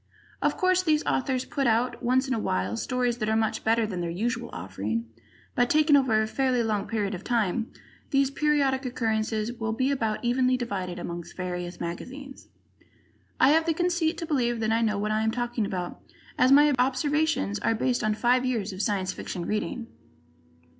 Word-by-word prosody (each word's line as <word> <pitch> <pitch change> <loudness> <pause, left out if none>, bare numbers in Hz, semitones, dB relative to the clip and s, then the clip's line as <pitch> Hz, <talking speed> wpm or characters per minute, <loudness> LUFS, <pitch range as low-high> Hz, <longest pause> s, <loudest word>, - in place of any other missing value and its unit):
Of - - +1
course, 370 0 +3
these 310 -4 +1
authors 260 -1 0
put 275 -2 -1
out, 235 +2 +1
once 255 +2 +2
in 260 - 0
a 230 - 0
while, 95 - -1
stories 245 - -1
that 215 -1 -1
are 220 - +2
much 220 0 0
better 225 0 +2
than 185 -4 -4
their 170 - -2
usual 215 +8 -2
offering, 100 +6 -3 0.5
but, 245 0 +2
taken 305 -1 +5
over 255 -6 +3
a 220 - +2
fairly 250 +1 +1
long 210 -3 -1
period 210 -3 -1
of 185 +1 -6
time, 230 -1 0 0.4
these 275 -1 +2
periodic 280 -2 +1
occurrences 220 -2 -1
will 225 -2 -3
be 260 +4 +1
about 225 -4 -1
evenly 255 +1 +2
divided 190 -7 -4
among 175 0 -5
various 180 -1 -4
magazines. 265 +11 -7 0.9
I 260 - +6
have 320 +2 +3
the 325 - +2
conceit 345 -1 +1
to 330 - -4
believe 240 -6 0
that 220 0 +1
I 225 +1 +2
know 215 -2 +1
what 210 +1 -1
I 215 0 +1
am 220 - +1
talking 240 -2 -2
about, 180 -2 -4 0.4
as 255 +1 +4
my 290 +1 +7
observations 270 -3 +1
are 225 - +1
based 245 +2 0
on 215 0 +1
five 250 +3 +2
years 225 -6 -1
of 185 - -4
Science 195 -4 0
Fiction 175 -2 -5
reading. 230 +4 -2
235 Hz, 190 wpm, -27 LUFS, 210-265 Hz, 0.9 s, my